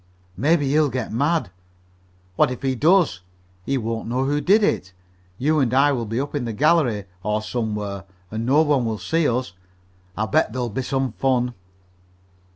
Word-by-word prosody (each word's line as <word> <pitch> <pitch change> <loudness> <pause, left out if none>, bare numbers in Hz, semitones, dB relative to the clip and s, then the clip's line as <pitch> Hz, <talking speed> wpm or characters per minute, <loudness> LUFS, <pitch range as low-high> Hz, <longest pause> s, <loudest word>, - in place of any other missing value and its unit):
"Maybe 145 - +2
he'll 150 +1 +3
get 125 -2 -4
mad." 145 - 0 0.8
"What 150 - +3
if 125 0 -6
he 135 -1 +1
does? 155 - +3 0.5
He 135 - +1
won't 115 -2 -3
know 125 +3 0
who 145 +2 0
did 205 +6 +4
it. 95 - 0 0.4
You 155 +5 +1
and 130 -5 +1
I 140 +2 +5
will 120 -5 -2
be 115 +3 -2
up 140 +1 -3
in 145 -4 -2
the 115 - -3
gallery, 130 - +2 0.2
or 105 +1 -1
somewhere, 105 -4 -3 0.3
and 110 +1 -3
no 140 +6 +4
one 145 -5 +2
will 110 -2 -2
see 150 - 0
us. 120 -6 -2 0.6
I'll 110 - 0
bet 110 +1 +1
there'll 125 -1 -2
be 115 +5 -3
some 135 0 -1
fun." 125 0 0
130 Hz, 175 wpm, -22 LUFS, 110-145 Hz, 0.8 s, I